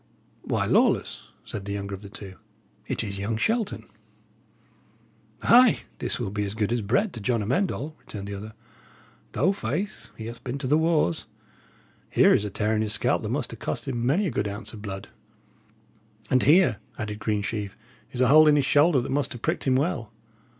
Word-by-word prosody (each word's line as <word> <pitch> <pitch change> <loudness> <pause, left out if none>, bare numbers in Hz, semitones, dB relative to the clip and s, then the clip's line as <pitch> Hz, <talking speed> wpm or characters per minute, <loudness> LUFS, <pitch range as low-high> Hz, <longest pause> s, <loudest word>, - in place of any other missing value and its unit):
"Why, - - -1
Lawless," - - +2 0.2
said 100 - -6
the 100 - -3
younger 100 0 -4
of 95 - -6
the 100 - -10
two, 100 -4 -9 0.5
"it - - -1
is 100 -1 -5
young 105 +3 -1
Shelton." 220 - -1 1.6
"Ay, 245 0 +6 0.2
this - - -2
will 110 -6 -3
be 105 0 -1
as 100 +1 -4
good 110 0 0
as 120 - 0
bread 130 - +1
to 115 - -7
John 115 +1 0
Amend 150 - +1
All," 155 +3 -5
returned 100 -2 -8
the 100 - -5
other. 105 +2 -7 0.8
"Though, 150 - +3
faith, 185 - -3
he 110 - -7
hath 115 +1 -8
been 125 +1 -3
to 140 - -5
the 140 +4 +3
wars. 160 - +1 0.8
Here - - +5
is 105 - +2
a - - -2
tear 110 +2 0
in 110 - +1
his 105 -1 0
scalp - - +1
that - - -4
must - - -2
'a' - - -5
cost - - -4
him 120 -3 -2
many 150 +12 +2
a 175 - -1
good 105 -3 -1
ounce 100 +3 -6
of 110 - -9
blood." 95 -2 -6 1.2
"And 130 - +4
here," 150 - +5 0.2
added 105 -1 -4
Greensheve, 105 -1 -2 0.3
"is 125 - -3
a 125 - +5
hole 155 +4 +7
in 150 - +6
his 145 -2 +2
shoulder 145 0 +4
that - - -5
must 140 -1 0
have 120 - -10
pricked - - -1
him 130 - +4
well. 130 -6 -1
115 Hz, 200 wpm, -26 LUFS, 105-145 Hz, 1.6 s, hole